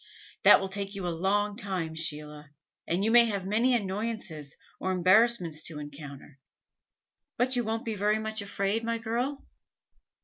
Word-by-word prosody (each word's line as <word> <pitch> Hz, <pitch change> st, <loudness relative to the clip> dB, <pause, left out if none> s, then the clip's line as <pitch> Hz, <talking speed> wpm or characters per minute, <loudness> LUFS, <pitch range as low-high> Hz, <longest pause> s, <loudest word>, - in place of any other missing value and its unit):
That -, -, +8 dB
will 195 Hz, -, -3 dB
take 200 Hz, +1 st, -5 dB
you 195 Hz, -2 st, -4 dB
a 175 Hz, -, -1 dB
long 205 Hz, +4 st, 0 dB
time, 185 Hz, -6 st, -3 dB
Sheila, 150 Hz, -2 st, -4 dB, 0.4 s
and 180 Hz, +4 st, 0 dB
you 225 Hz, -, +2 dB
may 240 Hz, 0 st, +7 dB
have 200 Hz, -4 st, -3 dB
many 230 Hz, +6 st, +2 dB
annoyances 195 Hz, -, -4 dB, 0.2 s
or 190 Hz, -, -1 dB
embarrassments 185 Hz, -3 st, +3 dB
to 160 Hz, -, -7 dB
encounter; 145 Hz, -1 st, -10 dB, 1.0 s
but 255 Hz, +2 st, +2 dB
you 245 Hz, -, +1 dB
won't 225 Hz, +1 st, -3 dB
be 225 Hz, -, -2 dB
very 210 Hz, +1 st, +1 dB
much 220 Hz, 0 st, -3 dB
afraid, 200 Hz, +2 st, -1 dB
my 230 Hz, 0 st, -1 dB
girl?" 240 Hz, +5 st, -3 dB
200 Hz, 160 wpm, -28 LUFS, 165-225 Hz, 1.0 s, That